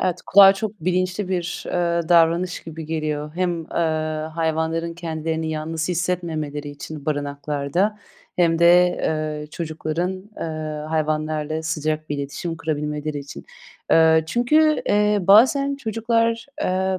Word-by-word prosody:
Evet, 180 Hz, -1 st, -1 dB
kulağa 195 Hz, 0 st, +8 dB
çok 210 Hz, 0 st, -5 dB
bilinçli 185 Hz, +3 st, -1 dB
bir, 180 Hz, -1 st, -3 dB
eee, 170 Hz, -2 st, 0 dB
davranış 170 Hz, +1 st, +3 dB
gibi 160 Hz, -1 st, -8 dB
geliyor. 155 Hz, -1 st, -3 dB
Hem, 175 Hz, -2 st, -1 dB
eee, -, -, -23 dB, 0.6 s
hayvanların 165 Hz, +1 st, -1 dB
kendilerini 160 Hz, -1 st, -3 dB
yalnız 160 Hz, +1 st, -3 dB
hissetmemeleri 165 Hz, -4 st, -2 dB
için 145 Hz, +1 st, -9 dB
barınaklarda 145 Hz, +6 st, -1 dB, 0.4 s
hem 165 Hz, -2 st, +3 dB
de, 175 Hz, +1 st, +6 dB, 0.2 s
eee, 155 Hz, -1 st, -2 dB
çocukların, 160 Hz, +2 st, -3 dB, 0.2 s
eee, 155 Hz, -1 st, -5 dB
hayvanlarla 155 Hz, 0 st, -1 dB
sıcak 155 Hz, -1 st, -2 dB
bir 145 Hz, -, -2 dB
iletişim 165 Hz, +4 st, -4 dB
kurabilmeleri 150 Hz, -1 st, -3 dB
için. 140 Hz, 0 st, -9 dB, 0.5 s
Eee, 160 Hz, -1 st, +5 dB
çünkü, 305 Hz, -, +3 dB
eee, 210 Hz, 0 st, +3 dB
bazen 260 Hz, +9 st, +5 dB
çocuklar, 230 Hz, -1 st, 0 dB, 0.2 s
eee, 190 Hz, -2 st, 0 dB
165 Hz, 120 wpm, -22 LUFS, 155-185 Hz, 0.6 s, kulağa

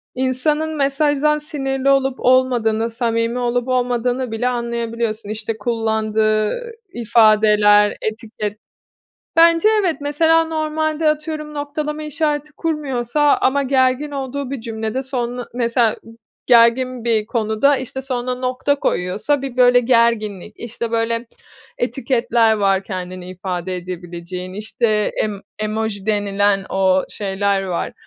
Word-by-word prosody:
insanın 295 Hz, +5 st, 0 dB
mesajdan 290 Hz, +1 st, +2 dB
sinirli 275 Hz, -3 st, -2 dB
olup 270 Hz, -1 st, +2 dB
olmadığını, 240 Hz, -3 st, +2 dB
samimi 230 Hz, +1 st, -1 dB
olup 245 Hz, 0 st, -1 dB
olmadığını 250 Hz, -1 st, 0 dB
bile 225 Hz, +3 st, -1 dB
anlayabiliyorsun. 235 Hz, -3 st, -3 dB
İşte, 220 Hz, +1 st, -4 dB
kullandığı 220 Hz, -, 0 dB, 0.2 s
ifadeler, 210 Hz, -2 st, +4 dB
etiket. 215 Hz, -1 st, -4 dB, 0.8 s
Bence, 335 Hz, +4 st, +5 dB
evet. 350 Hz, -4 st, 0 dB
Mesela, 325 Hz, +3 st, +3 dB
normalde 310 Hz, 0 st, -1 dB
atıyorum, 305 Hz, 0 st, -3 dB
noktalama 300 Hz, +1 st, -4 dB
işareti 300 Hz, -1 st, -2 dB
kurmuyorsa 295 Hz, -5 st, -2 dB, 0.2 s
ama 280 Hz, +2 st, +1 dB
gergin 260 Hz, +2 st, +1 dB
olduğu 275 Hz, -1 st, -4 dB
bir 275 Hz, -, -3 dB
cümlede 225 Hz, +1 st, -3 dB
son 245 Hz, -2 st, -4 dB
mesela, 235 Hz, -2 st, +1 dB, 0.5 s
gergin 245 Hz, +1 st, +4 dB
bir 220 Hz, -2 st, +1 dB
konuda, 225 Hz, +5 st, +1 dB
işte, 260 Hz, +1 st, -5 dB
sonuna 255 Hz, -1 st, -3 dB
nokta 255 Hz, +2 st, 0 dB
koyuyorsa 210 Hz, +11 st, 0 dB
bir, 265 Hz, -2 st, -6 dB
böyle, 245 Hz, 0 st, +6 dB
gerginlik, 230 Hz, -5 st, +1 dB
işte, 235 Hz, 0 st, -5 dB
böyle, 230 Hz, +1 st, -1 dB, 0.5 s
etiketler 240 Hz, -2 st, +1 dB
var 195 Hz, -2 st, +1 dB
kendini 185 Hz, -2 st, -6 dB
ifade 185 Hz, 0 st, -4 dB
edebileceğin, 180 Hz, 0 st, -7 dB
işte, 215 Hz, +1 st, 0 dB
em 210 Hz, -2 st, -3 dB, 0.2 s
emoji 215 Hz, -2 st, -3 dB
denilen 205 Hz, -2 st, +1 dB
o 190 Hz, -1 st, +2 dB
şeyler 200 Hz, -1 st, -1 dB
var, 180 Hz, -3 st, -3 dB
235 Hz, 115 wpm, -19 LUFS, 215-275 Hz, 0.8 s, böyle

